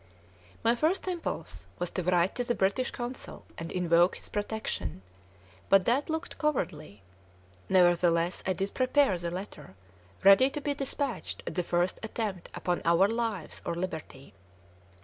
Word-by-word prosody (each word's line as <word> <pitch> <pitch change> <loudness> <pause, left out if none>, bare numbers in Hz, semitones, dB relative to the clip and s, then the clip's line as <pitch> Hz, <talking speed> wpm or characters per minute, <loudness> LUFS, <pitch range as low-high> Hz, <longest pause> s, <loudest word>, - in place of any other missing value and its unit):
My 230 - +4
first 315 +10 +1
impulse 355 -3 -4
was 175 0 -2
to 185 - -2
write 180 +1 +2
to 245 - -1
the 240 0 0
British 200 +7 +1
Consul 245 +1 -6
and 165 0 -6
invoke 175 0 +3
his - - -8
protection; 205 - -3 0.7
but 195 -1 +6
that 270 +7 +1
looked 320 +1 -4
cowardly. 160 - -2 0.7
Nevertheless, 175 -1 +3
I 190 - +2
did 195 +1 -3
prepare 255 -4 +3
the 170 0 -3
letter, 180 - -7 0.5
ready 195 +7 +7
to 295 - -4
be 290 0 -1
despatched 275 -1 -3
at - - -4
the 180 - 0
first 175 +1 0
attempt 215 -5 -4
upon 175 0 -1
our 170 +3 +5
lives 225 -6 -2
or - - -2
liberty. 160 - -6
190 Hz, 150 wpm, -29 LUFS, 175-245 Hz, 0.7 s, ready